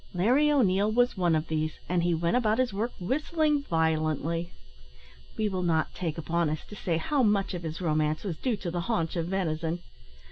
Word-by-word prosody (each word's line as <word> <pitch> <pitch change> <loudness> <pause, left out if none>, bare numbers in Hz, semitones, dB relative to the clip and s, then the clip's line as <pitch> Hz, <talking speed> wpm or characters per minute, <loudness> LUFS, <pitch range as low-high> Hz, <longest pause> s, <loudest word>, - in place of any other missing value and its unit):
Larry 255 +12 +4
O'Neil 210 -6 +3
was 245 +2 +2
one 175 -4 +2
of 155 +1 -1
these, 155 0 -1
and 180 -1 +1
he 170 0 +2
went 170 +4 0
about 220 -3 +2
his 255 -5 +1
work 225 +5 -1
whistling 300 - +1
violently. 160 - 0 0.9
We 215 - +1
will 190 -3 -2
not 165 -3 +1
take 165 -4 -3
upon 165 0 0
us 155 0 -4
to 210 - -8
say 170 -4 -1
how 275 - 0
much 205 -4 +2
of 175 - -4
his 160 +1 -5
romance 155 -2 0
was 180 -6 -3
due 245 -5 0
to 180 -3 -4
the 175 0 -2
haunch 165 -8 0
of 165 -1 -1
venison. 170 -2 -2
175 Hz, 200 wpm, -28 LUFS, 160-215 Hz, 0.9 s, Larry